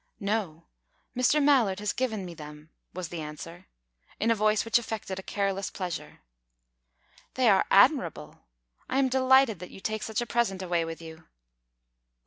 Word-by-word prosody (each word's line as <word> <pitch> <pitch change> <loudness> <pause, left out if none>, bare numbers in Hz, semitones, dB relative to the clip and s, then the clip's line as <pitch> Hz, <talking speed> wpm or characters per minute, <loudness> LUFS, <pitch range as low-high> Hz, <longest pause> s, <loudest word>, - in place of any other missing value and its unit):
"No. 200 -6 -2 0.5
Mr. 255 +4 +3
Mallard 250 -10 +4
has 210 0 -2
given 220 -7 -2
me 175 - -7
them," 150 0 -11 0.2
was 180 -2 -6
the 170 -2 -5
answer, 165 +4 -9 0.5
in 225 +2 +2
a - - +6
voice 215 0 +2
which 230 +1 +3
affected 215 -5 -5
a - - -5
careless 195 0 -2
pleasure. 170 - -6 1.1
"They - - +2
are - - +5
admirable. - - +3 0.5
I 260 - 0
am 270 -1 +3
delighted 260 -5 +4
that 180 - -8
you - - -12
take 215 +2 -3
such 220 0 -2
a 240 - -1
present 225 -6 0
away 170 -2 0
with 165 0 -7
you." 160 0 -11
195 Hz, 160 wpm, -28 LUFS, 170-230 Hz, 1.1 s, a